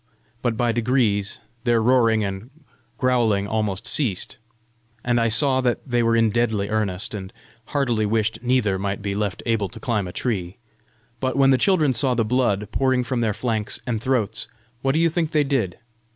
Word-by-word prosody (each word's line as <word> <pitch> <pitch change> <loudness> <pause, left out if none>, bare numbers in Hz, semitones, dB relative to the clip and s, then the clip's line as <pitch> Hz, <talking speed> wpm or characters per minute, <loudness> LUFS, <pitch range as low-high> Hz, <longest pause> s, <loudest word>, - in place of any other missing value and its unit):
But 120 -3 -1
by 120 0 +2
degrees 115 -4 0 0.2
their 120 -2 +3
roaring 115 -2 +3
and 100 +4 -5 0.5
growling 115 -6 +2
almost 105 0 -2
ceased, 125 -7 +1 0.7
and 120 -1 +2
I 115 - +2
saw 130 +4 +3
that 125 -2 +1
they 120 -2 +1
were 115 0 +2
in 115 -1 +3
deadly 110 -3 0
earnest, 105 -2 -1
and 95 -2 -6 0.3
heartily 120 -7 0
wished 110 +1 0
neither 120 -6 +1
might 100 +1 -3
be 100 -1 -2
left 100 -1 -2
able 110 -4 0
to - - -10
climb 110 -6 -1
a - - -6
tree. 95 -5 -3 0.6
But 130 -1 -1
when 135 -1 +5
the 130 - +3
children 160 -9 +3
saw 130 +1 +1
the 115 -1 +1
blood 110 -4 0
pouring 130 -2 +1
from 125 -1 -2
their 110 -3 0
flanks 110 -2 -2
and 115 -4 -2
throats, 125 -4 -1 0.3
what 135 0 +1
do 155 - +1
you 165 - +4
think 165 -1 -1
they 150 -1 +4
did? 130 - -1
115 Hz, 180 wpm, -23 LUFS, 105-130 Hz, 0.7 s, when